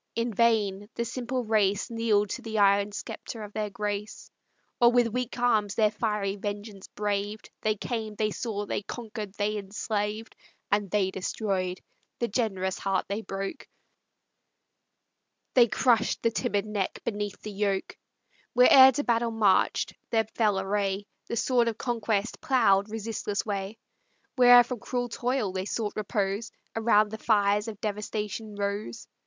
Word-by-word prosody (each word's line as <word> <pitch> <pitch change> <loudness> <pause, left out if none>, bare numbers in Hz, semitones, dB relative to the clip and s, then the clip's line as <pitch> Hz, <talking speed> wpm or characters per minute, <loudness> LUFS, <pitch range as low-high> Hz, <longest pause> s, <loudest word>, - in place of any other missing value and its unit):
In 230 0 -1
vain 205 -3 +2
the 235 - -1
simple 250 +1 -3
race 210 -1 +1
Kneel'd 215 -3 +1
to - - -4
the 220 -1 -4
iron 200 0 +4
sceptre 220 +2 -7
of 205 0 -9
their 215 -1 -2
grace, 205 0 -5 0.5
Or 240 -1 +6
with 245 -1 +3
weak 250 0 -2
arms 215 -4 +2
their 215 -2 +3
fiery 210 -2 -1
vengeance 205 0 -6
braved; 205 0 -3
They 215 0 +1
came, 220 0 -4
they 215 0 0
saw, 205 -2 -3
they - - -2
conquer'd, 215 -2 -7
they 210 +1 -1
enslaved, 210 +2 -3 0.4
And 205 -1 +1
they 190 -1 +1
destroy'd; 185 -1 -2 0.4
the 235 - -1
generous 195 -5 -1
heart 195 -1 0
they 200 +2 -2
broke, 195 -2 -5 1.9
They 245 -2 +6
crush'd 230 0 +2
the 230 - +3
timid 215 -3 -1
neck 210 -3 -2
beneath 205 -2 -3
the 215 - -5
yoke; 200 - -1 0.6
Where'er 260 +2 +8
to 290 - -1
battle 235 -2 +1
march'd 215 -4 +2
their 225 -1 +2
fell 210 -4 +2
array, 195 0 -1 0.2
The - - -3
sword 240 0 +2
of 225 -2 -1
conquest 225 -3 -1
plough'd 220 -9 +3
resistless 215 -2 -3
way; 200 0 -3 0.6
Where'er 245 -2 +8
from 245 0 -5
cruel 245 +1 -3
toil 245 -3 -1
they 185 0 -3
sought 210 0 -2
repose, 210 0 -2 0.2
Around 215 -2 +3
the 220 - -6
fires 205 -1 +2
of 215 -3 -6
devastation 210 0 -4
rose. 200 - -4
210 Hz, 150 wpm, -28 LUFS, 200-230 Hz, 1.9 s, Where'er